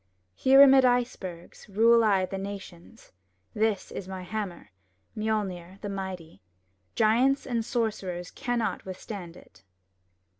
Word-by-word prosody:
Here 270 Hz, -, +7 dB
amid 270 Hz, -1 st, +7 dB
icebergs, 235 Hz, -9 st, -2 dB
Rule 230 Hz, +3 st, +5 dB
I 195 Hz, -3 st, +3 dB
the 195 Hz, +1 st, -5 dB
nations; 195 Hz, +1 st, -9 dB, 0.4 s
This 215 Hz, -2 st, 0 dB
is 185 Hz, -, -6 dB
my 190 Hz, -1 st, -6 dB
hammer, 190 Hz, -, -6 dB, 0.4 s
Mjolner, 200 Hz, -4 st, -3 dB
the 205 Hz, -, -4 dB
mighty; 190 Hz, -4 st, -6 dB, 0.5 s
Giants 245 Hz, +5 st, +3 dB
and 235 Hz, -3 st, -1 dB
sorcerers 200 Hz, -7 st, -3 dB
Cannot 240 Hz, -2 st, -2 dB
withstand 185 Hz, -2 st, -8 dB
it! -, -, -19 dB
205 Hz, 115 wpm, -27 LUFS, 185-230 Hz, 0.5 s, Here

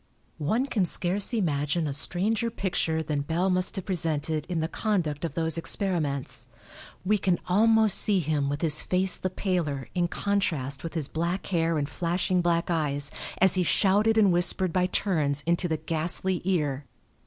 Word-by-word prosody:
One 215 Hz, -, 0 dB
can 205 Hz, -9 st, 0 dB
scarce 190 Hz, +6 st, 0 dB
imagine 155 Hz, -, 0 dB
a 145 Hz, -, -2 dB
stranger 210 Hz, -, 0 dB
picture 175 Hz, -7 st, -1 dB
than 150 Hz, -2 st, -2 dB
Bell 170 Hz, +6 st, 0 dB
must 185 Hz, 0 st, 0 dB
have 190 Hz, -, -4 dB
presented 160 Hz, -4 st, -1 dB
in 175 Hz, -2 st, -1 dB
the 160 Hz, -, -1 dB
conduct 175 Hz, -7 st, -2 dB
of 160 Hz, -4 st, -4 dB
those 165 Hz, 0 st, 0 dB
experiments. 165 Hz, -8 st, -2 dB, 0.6 s
We 210 Hz, +2 st, +2 dB
can 185 Hz, -3 st, +1 dB
almost 220 Hz, +2 st, +4 dB
see 205 Hz, -3 st, +2 dB
him 150 Hz, -3 st, -1 dB
with 145 Hz, +1 st, -3 dB
his 155 Hz, -3 st, +4 dB
face 185 Hz, 0 st, +3 dB
the 185 Hz, -, -3 dB
paler 175 Hz, -8 st, -2 dB
in 175 Hz, -1 st, +1 dB
contrast 165 Hz, -9 st, -2 dB
with 165 Hz, 0 st, -6 dB
his 155 Hz, -4 st, -2 dB
black 170 Hz, +5 st, -3 dB
hair 165 Hz, -3 st, 0 dB
and 145 Hz, -1 st, -1 dB
flashing 180 Hz, +3 st, 0 dB
black 170 Hz, 0 st, 0 dB
eyes 145 Hz, -3 st, -1 dB, 0.3 s
as 190 Hz, 0 st, +4 dB
he 185 Hz, -, +1 dB
shouted 205 Hz, +5 st, +3 dB
and 205 Hz, -4 st, +5 dB
whispered 175 Hz, 0 st, +1 dB
by 180 Hz, -1 st, +2 dB
turns 150 Hz, -8 st, -1 dB
into 170 Hz, +2 st, +1 dB
the 160 Hz, -2 st, -1 dB
ghastly 165 Hz, +3 st, -2 dB
ear. 150 Hz, -7 st, -1 dB
175 Hz, 170 wpm, -26 LUFS, 155-190 Hz, 0.6 s, and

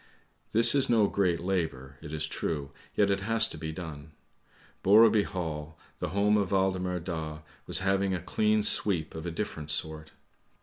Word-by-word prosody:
This 115 Hz, +2 st, +6 dB
is 140 Hz, -2 st, +2 dB
no 115 Hz, -3 st, +4 dB
great 90 Hz, -4 st, +1 dB
labour, 80 Hz, -8 st, -3 dB
it 75 Hz, -2 st, -9 dB
is 80 Hz, 0 st, -1 dB
true, 75 Hz, -2 st, -4 dB, 0.2 s
yet 100 Hz, -1 st, +3 dB
it 100 Hz, 0 st, 0 dB
has 115 Hz, +2 st, +2 dB
to -, -, -7 dB
be 80 Hz, 0 st, -5 dB
done. 80 Hz, -2 st, -8 dB, 0.7 s
Borreby 105 Hz, +1 st, +5 dB
Hall, 80 Hz, -5 st, -5 dB, 0.2 s
the -, -, -3 dB
home 105 Hz, +2 st, +2 dB
of 100 Hz, -3 st, 0 dB
Waldemar 95 Hz, -2 st, 0 dB
Daa 80 Hz, -3 st, -5 dB, 0.3 s
was 90 Hz, -, +2 dB
having 95 Hz, 0 st, +1 dB
a -, -, -3 dB
clean 105 Hz, +4 st, +1 dB
sweep 90 Hz, -7 st, +1 dB
of 80 Hz, +2 st, -6 dB
a -, -, -3 dB
different 80 Hz, -4 st, -5 dB
sort. 80 Hz, +1 st, -3 dB
90 Hz, 170 wpm, -28 LUFS, 80-100 Hz, 0.7 s, This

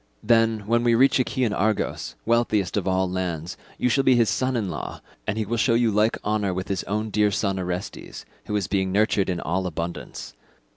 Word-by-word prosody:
Then, 115 Hz, -1 st, +3 dB
when 115 Hz, +2 st, +2 dB
we 120 Hz, -1 st, +4 dB
reach 135 Hz, +3 st, +4 dB
Achaean 125 Hz, -3 st, 0 dB
Argos, 110 Hz, +1 st, -1 dB
wealthiest 110 Hz, -5 st, +1 dB
of 100 Hz, -2 st, -1 dB
all 95 Hz, 0 st, +2 dB
lands, 90 Hz, -2 st, -3 dB, 0.2 s
you -, -, +1 dB
shall 135 Hz, +2 st, +2 dB
be 130 Hz, -1 st, +5 dB
his 115 Hz, -2 st, +3 dB
son 130 Hz, 0 st, 0 dB
in 110 Hz, -4 st, -1 dB
law, -, -, -5 dB, 0.3 s
and 110 Hz, 0 st, -1 dB
he 110 Hz, -, -1 dB
will 120 Hz, +3 st, -2 dB
show 115 Hz, +1 st, +3 dB
you 115 Hz, -1 st, +3 dB
like 105 Hz, +2 st, +2 dB
honour 105 Hz, -3 st, 0 dB
with 95 Hz, +2 st, -4 dB
his 95 Hz, -2 st, -1 dB
own 105 Hz, +2 st, -2 dB
dear 105 Hz, 0 st, +3 dB
son 100 Hz, -1 st, -1 dB
Orestes, 90 Hz, 0 st, -5 dB, 0.2 s
who 105 Hz, -, -2 dB
is 100 Hz, -3 st, 0 dB
being 95 Hz, -1 st, 0 dB
nurtured 105 Hz, -1 st, +2 dB
in 90 Hz, -2 st, -1 dB
all 95 Hz, +3 st, -1 dB
abundance. 85 Hz, 0 st, -6 dB
105 Hz, 205 wpm, -24 LUFS, 95-115 Hz, 0.3 s, be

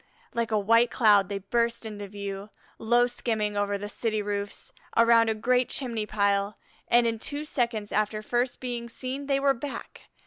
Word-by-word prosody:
Like 235 Hz, -1 st, -1 dB
a 215 Hz, -, +1 dB
white 230 Hz, +4 st, +4 dB
cloud 205 Hz, -5 st, +4 dB
they 200 Hz, -, -2 dB
burst 235 Hz, +4 st, 0 dB
into 205 Hz, -2 st, -6 dB
view, 200 Hz, 0 st, -6 dB, 0.3 s
low 240 Hz, +2 st, +4 dB
skimming 220 Hz, -4 st, -1 dB
over 205 Hz, 0 st, 0 dB
the 205 Hz, +1 st, -6 dB
city 215 Hz, +1 st, -2 dB
roofs, 205 Hz, 0 st, -4 dB, 0.2 s
around 230 Hz, -1 st, +6 dB
a 220 Hz, -, 0 dB
great 250 Hz, +3 st, +1 dB
chimney 230 Hz, -5 st, -1 dB
pile, 200 Hz, -1 st, +1 dB, 0.3 s
and 240 Hz, 0 st, +5 dB
in 230 Hz, -1 st, 0 dB
two 290 Hz, +6 st, -5 dB
seconds 235 Hz, -7 st, -1 dB
after 215 Hz, 0 st, 0 dB
first 245 Hz, +3 st, -1 dB
being 240 Hz, -2 st, -4 dB
seen 260 Hz, +4 st, -5 dB
they 275 Hz, -1 st, +2 dB
were 275 Hz, 0 st, +3 dB
back. 275 Hz, +2 st, -8 dB
225 Hz, 175 wpm, -27 LUFS, 205-240 Hz, 0.3 s, around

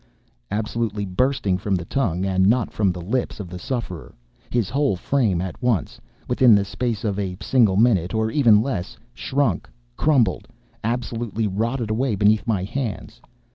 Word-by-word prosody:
absolutely 105 Hz, -1 st, -2 dB
bursting 95 Hz, -1 st, 0 dB
from 100 Hz, 0 st, 0 dB
the 85 Hz, -2 st, -3 dB
tongue 95 Hz, -7 st, -1 dB
and 95 Hz, 0 st, +2 dB
not 115 Hz, +1 st, +2 dB
from 100 Hz, -3 st, +2 dB
the 90 Hz, -, -6 dB
lips 110 Hz, +8 st, -2 dB
of 95 Hz, -4 st, -6 dB
the 90 Hz, -, -6 dB
sufferer, 115 Hz, -6 st, -5 dB, 0.3 s
his 120 Hz, -5 st, 0 dB
whole 140 Hz, -4 st, +1 dB
frame 105 Hz, -2 st, +1 dB
at 90 Hz, +2 st, -5 dB
once—within 120 Hz, -, +1 dB
the 100 Hz, -1 st, +2 dB
space 115 Hz, +2 st, -3 dB
of 105 Hz, -2 st, -1 dB
a 95 Hz, -3 st, -3 dB
single 110 Hz, -2 st, +3 dB
minute, 100 Hz, -5 st, +3 dB
or 110 Hz, 0 st, 0 dB
even 110 Hz, -7 st, +5 dB
less, 105 Hz, -9 st, -4 dB, 0.2 s
shrunk—crumbled—absolutely 115 Hz, -, -2 dB
rotted 115 Hz, +3 st, -1 dB
away 120 Hz, 0 st, 0 dB
beneath 105 Hz, +4 st, +2 dB
my 105 Hz, -5 st, 0 dB
hands. 105 Hz, -, -5 dB
105 Hz, 145 wpm, -22 LUFS, 95-120 Hz, 0.3 s, even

